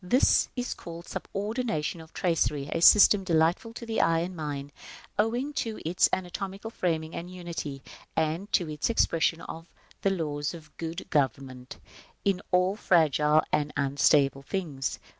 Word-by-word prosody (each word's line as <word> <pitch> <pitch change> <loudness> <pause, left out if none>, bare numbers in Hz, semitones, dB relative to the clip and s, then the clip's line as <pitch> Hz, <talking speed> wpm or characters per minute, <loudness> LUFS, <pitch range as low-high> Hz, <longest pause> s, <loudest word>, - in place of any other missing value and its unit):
This 245 +9 +3
is 245 -1 -2
called 170 0 -9
the - - -14
subordination 205 -6 -3
of 160 0 -14
tracery, 150 -5 0
a 165 - -1
system 205 +2 +7
delightful 170 +5 +1
to 235 - -8
the 225 -1 0
eye 165 0 +3
and 180 +2 -4
mind, 145 -3 -5 0.5
owing 240 +7 0
to 225 -2 -4
its 175 +3 +3
anatomical 195 +4 -4
framing 160 -5 -2
and 175 +1 -6
unity, 170 -6 -6 0.3
and 165 +6 -1
to 175 - +2
its 150 +4 -2
expression 165 -7 +2
of 165 +1 -8 0.3
the 195 - +2
laws 150 -4 -2
of 155 -2 -14
good 165 +2 -5
government 130 -2 -1 0.5
in 195 -2 +1
all 180 +2 +2
fragile 155 -5 +3
and 150 0 +1
unstable 140 0 +3
things. 145 -4 -3
165 Hz, 150 wpm, -28 LUFS, 150-190 Hz, 0.5 s, system